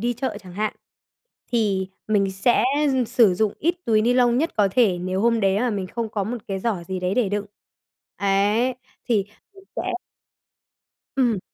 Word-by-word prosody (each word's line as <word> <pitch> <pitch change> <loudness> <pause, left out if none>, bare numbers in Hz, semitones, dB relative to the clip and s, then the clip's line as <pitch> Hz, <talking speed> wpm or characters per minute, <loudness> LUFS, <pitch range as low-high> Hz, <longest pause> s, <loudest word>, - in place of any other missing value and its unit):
đi 240 +1 0
chợ 260 -2 -3
chẳng 185 -2 -12
hạn, 210 +3 -2 0.8
thì 200 -5 +1 0.2
mình 200 -2 +2
sẽ 210 +4 +2 0.3
dư 255 -1 +2
sử 230 -5 +4
dụng 210 +2 +1
ít 340 +3 +1
túi 215 -2 +3
ni 245 +2 +3
lông 245 -1 +4
nhất 320 +4 +1
có 205 -2 +4
thể 195 -4 +3
nếu 185 +2 -2
hôm 230 +1 +3
đấy 195 -2 +3
là 245 0 +1
mình 200 -3 -2
không 230 +4 -4
có 205 -2 -2
một 235 +5 -3
cái 195 -1 -2
giỏ 195 -3 -1
gì 190 -1 -3
đấy 180 +1 0
để 235 -4 +2
đựng. 205 0 -2 0.7
Ấy, 205 +5 +2 0.3
thì 215 -5 +1 0.3
mình 390 0 -16
sẽ 375 +1 -2 1.2
Ừm. 240 -7 +2
215 Hz, 185 wpm, -23 LUFS, 195-240 Hz, 1.2 s, sử